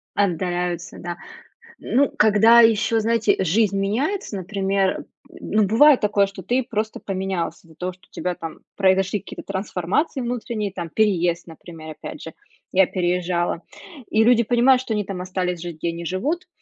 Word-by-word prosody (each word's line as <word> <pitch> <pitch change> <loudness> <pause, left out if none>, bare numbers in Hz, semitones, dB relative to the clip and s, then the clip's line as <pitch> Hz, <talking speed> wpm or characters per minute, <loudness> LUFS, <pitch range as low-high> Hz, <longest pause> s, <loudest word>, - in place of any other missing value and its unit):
Отдаляются, 180 -2 -1
да. 175 0 -5 0.6
Ну, 275 +2 +1
когда 220 +2 +6
ещё, 225 0 +3
знаете, 225 0 +2
э, - - -1
жизнь 200 +3 +2
меняется, 255 - -1
например, 195 0 0
м, - - -9 0.4
м, - - -8
ну, 215 0 +4
бывает 250 +8 +6
такое, 205 -1 +2
что 195 -2 -10
ты 250 +5 +1
просто 220 -1 -3
поменялся 190 -4 -4
из-за 160 - -18
того, 180 +3 -4
что 185 - -24
у - - -52
тебя 180 -1 -3
там 165 -1 -8 0.2
произошли 195 +1 +2
какие-то 195 - -10
трансформации 195 - -2
внутренние, 235 -4 -3
там, 175 -3 -6
переезд, 175 -4 +1
например, 160 -1 -10
опять 155 - -9
же, 160 - -8 0.4
я 190 0 +5
переезжала. 175 -1 -1 0.5
И 220 +1 +3
люди 235 0 +5
понимают, 245 +3 +4
что 225 - -3
они 210 -2 -1
там 185 -2 -5
остались 180 -2 -3
жить, 170 -3 -6
где 170 - -2
они 170 0 -5
живут, 300 - -2
195 Hz, 170 wpm, -22 LUFS, 180-225 Hz, 0.6 s, когда